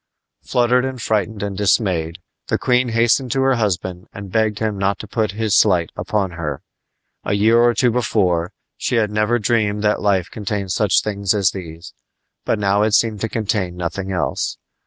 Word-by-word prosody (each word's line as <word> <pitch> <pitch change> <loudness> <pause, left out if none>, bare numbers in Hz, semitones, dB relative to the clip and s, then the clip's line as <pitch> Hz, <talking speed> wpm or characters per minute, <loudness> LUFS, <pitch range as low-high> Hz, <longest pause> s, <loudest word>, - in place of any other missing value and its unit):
Fluttered 125 +1 +2
and 130 -1 -4
frightened 110 -1 -1
and 100 -1 -3
dismayed, 95 -5 +1 0.3
the - - 0
queen 125 -1 +1
hastened 115 +2 +2
to 135 -1 +1
her 135 0 +3
husband 95 -4 -2
and 100 -2 -9
begged 110 -1 +1
him 110 -2 -1
not 100 0 0
to 110 - -9
put 110 -1 -1
this 110 -2 +1
slight 90 -6 +3
upon 100 -4 -1
her. 75 -5 -5 0.6
A - - -1
year 110 +3 +4
or 120 0 +4
two 125 -2 +3
before, 95 -7 0 0.3
she - - -1
had 110 -3 +1
never 105 +3 +1
dreamed 105 -2 0
that 105 0 +1
life 95 -4 +1
contained 100 -2 -3
such 100 0 +2
things 100 -1 -1
as 100 -3 +2
these; 85 -2 -9 0.5
but - - +1
now 100 0 +1
it 105 0 +3
seemed 110 -4 +1
to 110 - -1
contain 105 -5 -2
nothing 90 +2 -4
else. 90 -2 -2
105 Hz, 180 wpm, -20 LUFS, 95-115 Hz, 0.6 s, year